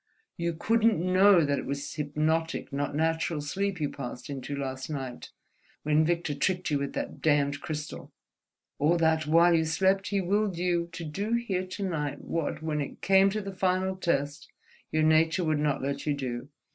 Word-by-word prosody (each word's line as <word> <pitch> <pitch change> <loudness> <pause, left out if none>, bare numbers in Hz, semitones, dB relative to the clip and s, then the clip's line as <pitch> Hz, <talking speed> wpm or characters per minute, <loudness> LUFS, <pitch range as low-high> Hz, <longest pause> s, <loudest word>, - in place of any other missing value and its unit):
You 170 -1 -2
couldn't 225 +4 +2
know 185 0 +5
that 140 0 0
it - - -6
was 140 +1 -4
hypnotic 155 +1 -1
not 145 +1 -2
natural 160 0 0
sleep 190 +6 -2
you 150 - 0
passed 125 0 -7
into 140 +1 -5
last 130 -1 -4
night, 135 -5 -5 0.5
when 150 +1 +3
Victor 170 -2 0
tricked 180 +4 -1
you 145 - +2
with 140 0 -3
that - - -5
damned 145 -2 +2
crystal, 150 -1 -6 0.7
or 160 +4 +3
that, 160 -2 +2
while 170 +2 +5
you 160 -1 +3
slept, 190 +4 +1
he 200 -1 0
willed 195 0 0
you 175 -1 0
to 170 - -6
do 200 +9 -3
here 195 -6 -1
to 200 +2 -5
night 150 -6 -2
what, 165 -1 -3
when 150 -2 -1
it 140 - -7
came 195 0 +5
to 215 +2 -2
the 195 -1 -6
final 185 0 0
test, 145 -6 -1 0.4
your 155 0 +2
nature 160 +3 +3
would 155 -2 +1
not 145 -3 0
let 140 +2 -3
you 145 - +2
do." 130 -1 -5
160 Hz, 185 wpm, -28 LUFS, 145-185 Hz, 0.7 s, know